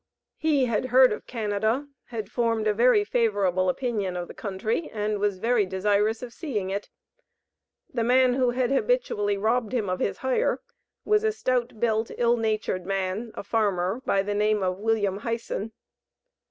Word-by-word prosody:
He 295 -4 +2
had 235 0 0
heard 255 +1 +6
of - - -8
Canada, 220 +4 -1 0.2
had 220 -4 -5
formed 230 -3 0
a 215 - +3
very 230 -1 +4
favorable 200 -5 +1
opinion 205 -4 -2
of 175 -1 -4
the - - -10
country 215 - -3
and 210 -1 -2
was 205 -2 0
very 230 +2 +2
desirous 205 +4 0
of 240 -1 -7
seeing 210 - -3
it. 200 +1 -4 1.0
The 235 -3 0
man 250 +1 +4
who 255 -1 +2
had 245 +1 0
habitually 270 - +1
robbed 225 +3 0
him 215 -7 0
of 185 - -2
his - - -1
hire, 260 -1 0 0.5
was 425 0 +3
a 440 - +2
"stout 250 - -1
built, 225 -1 +1
ill 240 0 +3
natured 215 -5 -1
man," 195 +4 -2
a - - -5
farmer, 200 0 0
by 195 -5 +1
the 205 +1 -2
name 210 0 +1
of 185 0 -1
William 210 -3 +1
Hyson. 230 -1 -4
220 Hz, 165 wpm, -26 LUFS, 200-245 Hz, 1.0 s, heard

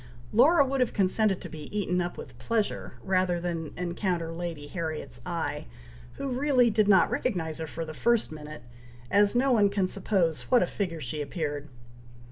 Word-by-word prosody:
Laura 280 +6 +6
would 270 0 -1
have 250 - +1
consented 195 0 +2
to - - -7
be 155 -2 -8
eaten 180 -3 0
up 175 0 -4
with - - -9
pleasure, 225 -3 -1
rather 185 -2 +1
than 170 -3 -3
encounter 175 -1 -2
Lady 165 -3 -5
Harriet's 155 - -5
eye, - - -3 0.5
who 275 - -4
really 255 -2 +3
did 215 -1 +3
not 200 - +5
recognize 165 -9 -2
her 160 - -4
for 165 +2 -5
the 155 - -7
first 235 +4 +1
minute, 150 -3 -9 0.5
as 205 +2 +4
no 265 +2 +3
one 210 -4 +5
can 200 -2 0
suppose 180 -5 0
what 250 - +5
a - - +2
figure 170 -6 -3
she 145 +3 -3
appeared. 145 -1 -4
180 Hz, 175 wpm, -28 LUFS, 160-215 Hz, 0.5 s, Laura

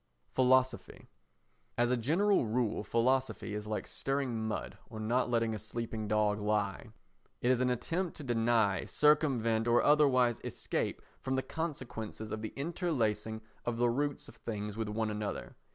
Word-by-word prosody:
Philosophy 130 -1 +2 0.7
As 120 +1 +3
a - - +4
general 160 - +2
rule 115 -2 0
philosophy 125 +1 +1
is 105 0 -4
like 105 0 -2
stirring 130 -5 -2
mud 110 - -3
or 110 -3 -7
not 120 +4 +1
letting 115 -2 +1
a 110 - -4
sleeping 110 0 -4
dog 105 0 +2
lie. 105 0 -1 0.5
It 125 - +2
is 125 -1 +2
an 125 - +3
attempt 170 +8 -2
to 150 - -7
deny, 115 -5 +2
circumvent 125 -7 +3
or 120 0 +4
otherwise 130 -5 +4
escape - - -2 0.2
from 130 0 -2
the 130 - 0
consequences 120 -9 -5
of 110 - -3
the 110 - -4
interlacing 120 - -1 0.2
of 120 -1 -2
the 120 0 +3
roots 145 +3 -2
of 115 - -14
things 105 -2 -4
with 110 -1 -2
one 110 0 -1
another. 105 -1 -4
120 Hz, 155 wpm, -32 LUFS, 110-130 Hz, 0.7 s, a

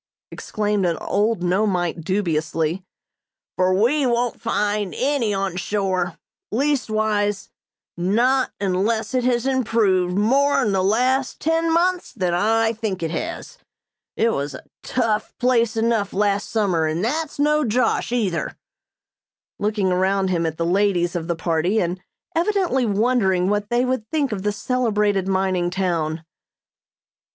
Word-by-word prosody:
exclaimed 210 -2 -2
an 170 -2 +1
old 205 -1 0
Nomeite 180 -2 0
dubiously, 165 -1 -1 0.7
"for 185 0 +2
we 240 +10 +2
won't 240 0 0
find 205 -2 -1
any 265 -5 +1
on 195 -2 -2
shore; 185 -2 -1 0.3
leastwise 215 -6 0 0.5
not 235 +9 +2
unless 205 +5 0
it 255 -1 +1
has 245 -1 +1
improved 215 -8 +1
more 275 +7 +3
in 210 - +1
the 190 -1 +1
last 250 +6 +1
ten 325 +1 +1
months 355 +2 +1
than 185 -7 -1
I 225 +5 +2
think 210 -5 -4
it 160 - -2
has. - - -5 0.6
It 230 - +3
was 140 -6 -3
a - - -11 0.2
tough 225 -4 -1
place 235 -3 +2
enough 225 -3 0
last 200 0 0
summer, 185 -8 +1
and 165 +6 -1
that's 310 +5 -2
no 300 +1 +2
josh 235 0 0
either!" 195 -10 -1 1.0
looking 205 -2 0
around 190 +1 +1
him 170 -2 +1
at 160 0 -4
the 165 - -1
ladies 180 -1 +1
of 165 -1 -3
the 170 - -1
party 165 +5 0
and 180 0 -2 0.3
evidently 340 - +1
wondering 200 -4 +2
what 205 0 -1
they 240 +1 +2
would 255 -4 -2
think 290 -5 0
of 200 -3 -3
the 210 +1 0
celebrated 210 -4 0
mining 190 -2 0
town. 170 -4 -1
205 Hz, 140 wpm, -22 LUFS, 185-240 Hz, 1.0 s, more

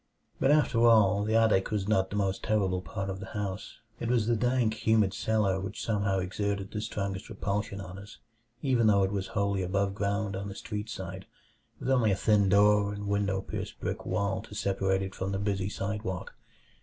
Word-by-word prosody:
But 135 - +3
after 145 -6 +3
all, 105 -3 +5
the 110 +1 0
attic 110 -4 +3
was 105 -3 -1
not 95 -3 +2
the - - -5
most 95 -2 0
terrible 95 -4 +1
part 100 0 -5
of 95 0 -4
the 100 - -7
house. 100 0 -4 0.2
It 115 - -3
was 120 -3 +2
the 120 +1 +2
dank, 125 -1 +1
humid 110 -4 +4
cellar 105 -3 +1
which 95 +2 -5
somehow 100 -3 +1
exerted 100 +1 -2
the 105 - -3
strongest 100 -2 -4
repulsion 100 0 -3
on 95 0 -8
us, 100 +1 -12 0.5
even 125 -5 +3
though 100 -2 +5
it 95 - 0
was 95 -2 -2
wholly 100 -1 +1
above 95 +2 0
ground 100 0 -1
on 100 +1 -4
the 100 - -7
street 105 0 -5
side, 95 -2 -6 0.5
with - - -5
only 120 -5 +4
a - - +3
thin 100 0 +3
door 100 0 +4
and 105 0 -5
window 100 -1 0
pierced - - -6
brick - - -3
wall 100 -1 -1
to 105 - -12
separate 95 -1 0
it 95 0 -5
from 95 +1 -3
the - - 0
busy 100 -1 -1
sidewalk. 100 -2 -4
100 Hz, 200 wpm, -29 LUFS, 95-105 Hz, 0.5 s, all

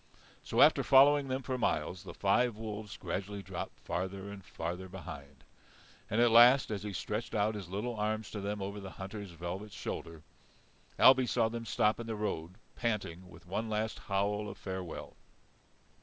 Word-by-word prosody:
So - - +1
after - - +6
following 140 +1 +6
them 130 0 -2
for 130 -1 -2
miles, 90 -4 0
the - - -8
five 115 +4 +2
wolves 105 -1 -6
gradually 100 +2 -4
dropped - - -6
farther 95 +2 -4
and 100 -1 -9
farther 90 +3 -5
behind. 75 -6 -9 0.7
And 110 - +1
at 120 -1 +5
last, 120 +2 +7
as 100 -3 -2
he 105 0 -4
stretched 110 +5 -3
out 105 +1 +2
his 100 -5 -7
little 110 +6 -3
arms 110 +1 -2
to 105 - -4
them 100 0 -3
over 100 +1 -5
the 95 -1 -7
hunter's 100 +1 -6
velvet 90 +5 -6
shoulder, 80 -4 -6 0.7
Ailbe 130 -1 +7
saw 115 -2 +2
them 115 0 -5
stop 110 -1 +2
in 115 - -5
the 110 - -2
road 90 -5 -3 0.2
panting, 95 -6 -2
with 85 -1 -15
one 105 +5 -3
last 110 0 -1
howl 105 +1 -1
of - - -9
farewell. 95 -3 -6
105 Hz, 170 wpm, -32 LUFS, 95-110 Hz, 0.7 s, last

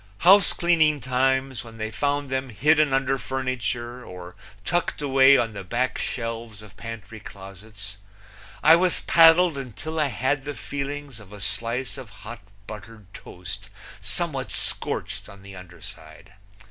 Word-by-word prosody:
Housecleaning 170 -5 +5
times, 130 -1 0
when 115 -1 -12
they 110 0 -4
found 145 +1 -1
them 130 0 -2
hidden 150 +6 +3
under 135 0 +1
furniture 125 -2 -3
or 90 -4 -10 0.3
tucked 175 +6 -1
away 135 -1 +6
on 115 -2 0
the 100 -1 -7
back 120 +7 -1
shelves 115 -3 -5
of 105 - -15
pantry 115 -1 -8
closets, 100 0 -11 0.7
I 160 +2 +9
was 180 0 +1
paddled 165 -2 +6
until 140 +6 -6
I 150 - +3
had 135 +1 -1
the 145 0 -5
feelings 140 -3 -5
of 100 -2 -15
a 105 - -10
slice 115 +8 -2
of 125 -4 -10 0.2
hot, 120 +2 -7 0.3
buttered 105 -1 -11
toast 95 +3 -8 0.3
somewhat 135 - -1
scorched 100 +2 -2
on 100 -1 -14
the 100 0 -11
under 90 -1 -13
side. 80 +5 -12
120 Hz, 145 wpm, -24 LUFS, 100-140 Hz, 0.7 s, I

